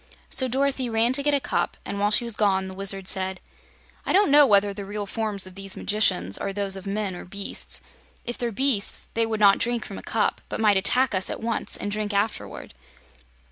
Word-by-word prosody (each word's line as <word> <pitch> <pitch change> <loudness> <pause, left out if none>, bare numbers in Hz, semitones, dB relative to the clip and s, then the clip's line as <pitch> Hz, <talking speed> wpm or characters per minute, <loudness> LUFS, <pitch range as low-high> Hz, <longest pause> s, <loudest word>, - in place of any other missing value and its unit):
So 260 - +1
Dorothy 265 0 -1
ran 230 +2 +2
to 280 - 0
get 290 0 +2
a - - +2
cup, 260 - -2
and 200 - -4
while 205 +1 +2
she 210 - +3
was 235 -2 -2
gone 190 -3 +1
the 190 - -8
Wizard 195 0 0
said: 190 -1 +1 0.6
"I - - -2
don't 390 -6 +4
know 290 0 +7
whether 200 -2 +3
the 200 0 -7
real 205 +1 -5
forms 210 -2 -2
of 185 - -8
these 195 0 -6
magicians 100 - +1
are - - -3
those 195 -1 -2
of 195 +1 -8
men 200 -2 -2
or - - -8
beasts. 200 +2 -2 0.4
If 240 - -3
they're 240 -1 -1
beasts, 235 -2 0
they 230 0 +1
would 220 -1 -2
not 200 -2 +5
drink 240 -1 -1
from 195 - -8
a - - -9
cup 220 -2 -1
but - - -4
might 210 -2 +4
attack 250 +6 +3
us 190 -1 +2
at - - -4
once 230 -1 -1
and 205 - -4
drink 210 0 -2
afterward. 205 - -3
205 Hz, 220 wpm, -24 LUFS, 195-235 Hz, 0.6 s, know